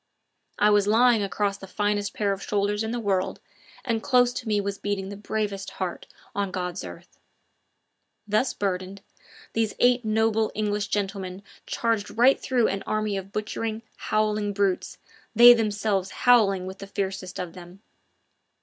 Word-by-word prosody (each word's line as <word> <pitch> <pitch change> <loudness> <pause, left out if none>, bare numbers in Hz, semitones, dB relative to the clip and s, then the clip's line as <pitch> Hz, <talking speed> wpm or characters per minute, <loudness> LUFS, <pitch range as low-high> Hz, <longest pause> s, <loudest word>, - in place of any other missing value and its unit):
I 210 0 +4
was 205 -1 +3
lying 230 +1 +4
across 200 0 -1
the 195 - -10
finest 205 0 -1
pair 205 -2 0
of 195 - -7
shoulders 205 +1 0
in 220 - -3
the 240 +1 -2
world, 195 -4 -1 0.5
and 230 -3 0
close 245 0 +3
to 245 - -6
me 210 -1 +2
was 200 0 -3
beating 200 -1 -3
the 200 - -6
bravest 205 -1 -3
heart 185 -2 -5 0.3
on 200 -1 -1
God's 180 0 -4
earth. - - -11 1.1
Thus 215 +5 +1
burdened, 190 0 -3 0.5
these 225 -2 0
eight 245 0 +3
noble 220 0 +1
English 210 -1 -1
gentlemen 195 -2 -3 0.2
charged 225 -2 -1
right 255 +3 +5
through 245 -3 +1
an 195 0 -2
army 215 -1 -1
of 195 0 -6
butchering, 215 +2 -3
howling 215 -1 0
brutes, 195 -2 -1 0.4
they 240 +2 +10
themselves 205 -4 0
howling 205 -7 +3
with 190 +1 -8
the 195 - -8
fiercest 195 -2 -4
of 180 -2 -5
them. 180 +3 -13
205 Hz, 155 wpm, -25 LUFS, 195-220 Hz, 1.1 s, they